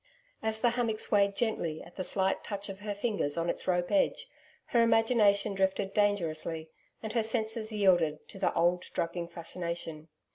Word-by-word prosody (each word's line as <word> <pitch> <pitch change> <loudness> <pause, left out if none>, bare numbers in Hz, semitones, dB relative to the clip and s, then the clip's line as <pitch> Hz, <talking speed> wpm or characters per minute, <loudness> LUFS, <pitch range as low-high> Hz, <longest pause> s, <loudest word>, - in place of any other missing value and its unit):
As 220 0 -1
the 240 - +4
hammock 230 -3 -1
swayed 200 -1 +2
gently 170 -9 -1
at 170 - -15
the 185 - -3
slight 190 +1 0
touch 200 -1 -4
of 195 0 -7
her 205 0 -4
fingers 200 -9 0
on 170 +1 +1
its - - -8
rope 175 -1 +1
edge, 295 -2 +2 0.4
her 235 - +4
imagination 225 -3 +4
drifted 195 0 0
dangerously 165 -6 0 0.3
and 220 -1 -4
her 230 - +2
senses 220 0 -1
yielded 175 -7 +2
to 195 - -9
the 190 - +2
old 175 +1 +3
drugging 170 0 -2
fascination. 170 -2 -5
200 Hz, 170 wpm, -30 LUFS, 170-220 Hz, 0.4 s, the